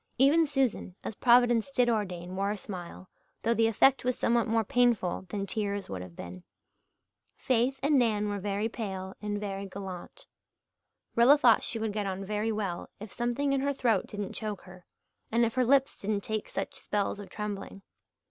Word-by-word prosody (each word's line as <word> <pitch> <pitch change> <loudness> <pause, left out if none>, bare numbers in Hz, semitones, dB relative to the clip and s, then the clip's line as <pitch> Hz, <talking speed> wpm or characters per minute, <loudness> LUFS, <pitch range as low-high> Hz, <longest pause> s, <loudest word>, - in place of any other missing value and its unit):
Even 305 +5 +5
Susan, 265 -10 -1
as - - -4
Providence 240 +1 +4
did 250 -3 +2
ordain, 185 -6 -2
wore 195 +1 0
a 210 - -2
smile, 185 -2 -8 0.4
though 230 - +3
the 225 0 +3
effect 260 +5 +4
was 250 0 0
somewhat 235 0 +2
more 225 0 +2
painful 220 -6 +1
than 200 +1 -3
tears 200 -2 -3
would 95 -1 -4
have 90 -2 -10
been. 90 +1 -9 0.9
Faith 255 +2 +1
and 285 -1 +4
Nan 215 -3 +1
were 205 -1 -2
very 205 +2 -1
pale 190 -5 -5
and 205 -1 -2
very 200 -1 -4
gallant. 195 - -8 0.9
Rilla 245 +5 +7
thought 245 -6 +5
she 230 - 0
would 220 -2 -2
get 205 -1 -2
on 195 0 -4
very 210 +2 -1
well 200 -5 -3
if 210 -1 -8
something 245 +4 0
in 270 - +1
her 280 +1 0
throat 245 -4 +1
didn't 205 -1 -5
choke 210 -3 -4
her, 185 -1 -14 0.4
and 235 +1 +3
if 225 - -2
her 255 - +2
lips 270 +2 +2
didn't 205 0 -1
take 215 -1 -3
such - - -4
spells 205 0 -1
of 205 - -9
trembling. 205 -2 -6
215 Hz, 185 wpm, -29 LUFS, 195-240 Hz, 0.9 s, Rilla